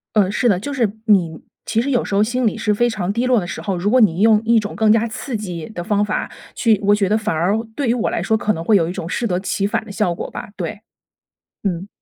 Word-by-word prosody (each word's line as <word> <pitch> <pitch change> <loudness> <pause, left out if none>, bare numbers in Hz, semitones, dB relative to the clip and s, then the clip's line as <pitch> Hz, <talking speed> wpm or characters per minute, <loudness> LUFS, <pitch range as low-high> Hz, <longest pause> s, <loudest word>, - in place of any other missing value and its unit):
嗯， 200 -3 +3
是 240 +3 +1
的。 190 - +3
就 285 +9 -5
是 235 -7 +1 0.2
你 175 -7 +3 0.3
其 225 +1 +1
实 280 - -2
有 245 -3 +1
时 - - -4
候 200 - +4
心 245 +2 0
里 220 - 0
是 210 -1 0
非 240 +3 +2
常 200 -4 -2
低 235 +3 -1
落 250 -2 +4
的 175 - -5
时 - - -6
候， 195 -3 -2
如 185 +4 0
果 255 +2 +4
你 185 -6 +3
用 220 0 +5
一 230 0 +4
种 210 -2 -3
更 220 0 +2
加 225 +1 +2
刺 230 +2 -5
激 180 -6 -6
的 175 -5 -5
方 205 +1 +1
法 210 - -2 0.2
去 225 -4 +2
我 205 +1 +4
觉 205 -2 +1
得 215 - +2
反 215 -5 -2
而 180 +7 +1 0.2
对 280 -4 -1
于 235 - +3
我 240 - -1
来 - - -2
说， 220 - +1
可 215 0 0
能 165 -3 -5
会 215 +3 +4
有 165 -4 +2
一 175 - -3
种 165 - -5
适 235 - -2
得 180 -4 0
其 195 +1 -1
反 220 +1 -1
的 205 - -9
效 195 -5 0
果 - - -6
吧， - - -7
对。 180 +3 -5 0.8
嗯。 185 0 -2
210 Hz, 305 characters per minute, -19 LUFS, 190-225 Hz, 0.8 s, 用